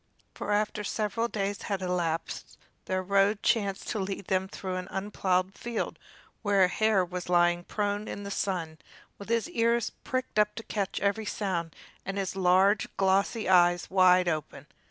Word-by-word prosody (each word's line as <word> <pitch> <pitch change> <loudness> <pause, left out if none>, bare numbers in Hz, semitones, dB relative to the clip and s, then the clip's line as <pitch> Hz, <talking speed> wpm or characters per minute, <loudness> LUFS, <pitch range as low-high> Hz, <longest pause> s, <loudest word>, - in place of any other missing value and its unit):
For - - -4
after 210 0 0
several 215 +2 -1
days 200 -3 -3
had 195 -2 -3
elapsed 175 -3 -2 0.3
their 185 0 -1
road 200 +2 +2
chanced 200 -4 +1
to 220 - -2
lead 195 0 -4
them 190 0 0
through 185 -1 -5
an 180 0 -5
unplowed 190 -1 0
field 235 +1 -4 0.4
where 200 -3 +3
a - - +6
hare 210 0 +2
was 180 0 -6
lying 175 0 +3
prone 205 +2 -2
in 205 - -6
the 200 - -6
sun, 165 -6 -2 0.4
with 200 - -9
his 230 -2 +1
ears 235 -1 +1
pricked 255 -4 -2
up 210 0 +2
to 225 - -6
catch 200 -3 -2
every 205 +2 0
sound, 175 -7 -2 0.3
and 195 +1 -4
his 190 -1 -2
large, 190 +2 +4
glossy 195 +4 +2
eyes 175 -1 +4
wide 185 -1 +5
open. 155 -3 -3
195 Hz, 165 wpm, -28 LUFS, 180-210 Hz, 0.4 s, a